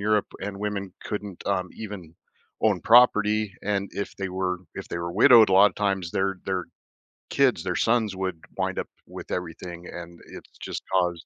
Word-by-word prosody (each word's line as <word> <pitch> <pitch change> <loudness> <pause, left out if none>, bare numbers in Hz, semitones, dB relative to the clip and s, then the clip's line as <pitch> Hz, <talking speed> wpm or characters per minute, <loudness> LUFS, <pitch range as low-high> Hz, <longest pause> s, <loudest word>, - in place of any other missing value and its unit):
Europe, 105 0 +2
and 100 0 -5
women 100 -2 -3
couldn't, 105 -3 -5
um, 95 -2 0
even 100 -7 -8 0.5
own 100 -5 +2
property, 105 -3 +4
and 100 -1 -1
if 100 - -4
they 95 -1 -3
were 90 -1 -2 0.2
if - - -7
they 85 - -4
were 85 0 -4
widowed, 115 +1 +7
a - - 0
lotta 100 +2 +6
times, 95 -4 -1
their 95 0 0
their 95 -2 -2 0.6
kids, 130 -11 +2
their 90 -1 -2
sons, 110 -3 +1
would 95 -3 -3 0.2
wind - - -1
up - - -3 0.2
with - - -9
everything, 85 0 -5
and 85 0 -9
it's - - -13
just - - -5
caused 90 -3 +1
95 Hz, 175 wpm, -25 LUFS, 90-105 Hz, 0.6 s, widowed